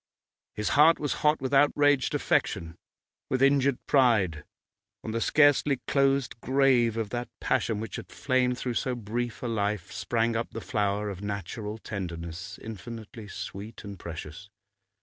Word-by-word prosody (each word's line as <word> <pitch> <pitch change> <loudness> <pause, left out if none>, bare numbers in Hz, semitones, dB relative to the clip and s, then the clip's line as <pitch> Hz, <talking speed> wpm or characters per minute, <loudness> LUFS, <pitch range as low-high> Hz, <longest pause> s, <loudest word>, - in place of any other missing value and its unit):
His 105 - -1
heart 155 +3 +6
was 145 - -1
hot 150 +1 +3
with 130 +1 -2
outraged 145 -1 +4
affection, 80 0 0 0.5
with 130 - +1
injured 140 -1 +4
pride. 105 - +3 0.6
On 110 - -4
the 115 +1 -1
scarcely 145 -2 +4
closed 135 -4 +1
grave 130 -4 +3
of 110 -2 -2
that 120 0 -3
passion 110 -3 0
which 110 - -5
had - - -9
flamed 125 +1 +1
through 125 -1 -2
so 125 +2 -1
brief 120 +2 -4
a - - -1
life 105 -2 -1
sprang 115 -1 0
up 115 +1 -1
the 115 - -4
flower 105 -1 -1
of 95 -1 -8
natural 105 +2 -4
tenderness, 90 -3 -6
infinitely 110 +1 -8
sweet 100 +3 -7
and 100 -3 -8
precious. 85 +3 -8
115 Hz, 150 wpm, -28 LUFS, 100-130 Hz, 0.6 s, heart